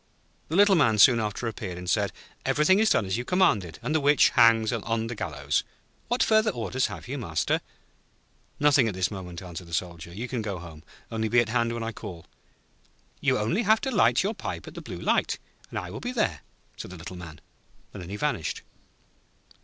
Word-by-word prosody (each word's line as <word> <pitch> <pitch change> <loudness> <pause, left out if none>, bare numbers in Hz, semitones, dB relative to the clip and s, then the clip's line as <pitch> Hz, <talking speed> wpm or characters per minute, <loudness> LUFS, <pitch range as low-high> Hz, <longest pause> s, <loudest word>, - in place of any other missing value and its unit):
The 160 - -2
Little 200 +1 +6
Man 140 - +4
soon 120 +3 +7
after 110 +2 -2
appeared, 95 -5 -5
and 90 0 -8
said: - - +1 0.3
'Everything 170 +7 +3
is 220 0 +4
done - - +3
as 95 +3 -1
you - - -2
commanded, 120 - +2
and 155 - -1
the 160 - +3
Witch 145 -1 +5
hangs 115 0 +5
on 115 0 -1
the 115 - -4
gallows. 110 - -1 0.4
What 245 - +2
further 220 0 +4
orders 130 - -1
have - - -8
you, 140 +3 -4
Master?' 80 -9 0 1.0
'Nothing 140 -4 +4
at 105 - -3
this 95 +1 0
moment,' 90 -2 -7
answered 90 -1 -8
the 85 - -3
Soldier. 85 -1 -4
'You 110 +8 -5
can 125 -2 -3
go 100 -3 -4
home; 80 -3 -10 0.3
only 110 -1 -1
be 120 - +5
at 120 -2 +1
hand 115 0 +1
when 115 -1 -3
I 115 - -3
call.' 85 -6 -9 0.9
'You - - +2
only 135 - 0
have 220 0 +4
to 265 - -2
light 215 - +4
your 205 +3 0
pipe - - -6
at - - -9
the - - -8
Blue - - -7
Light, - - +1 0.3
and - - -6
I - - -4
will - - -6
be 245 - -4
there,' 240 -4 0 0.4
said - - -7
the 90 - -9
Little 85 +3 -8
Man, 85 -4 -10 0.5
and - - -7
then 85 - -9
he 100 - -4
vanished. 105 - -2
115 Hz, 210 wpm, -27 LUFS, 90-145 Hz, 1.0 s, soon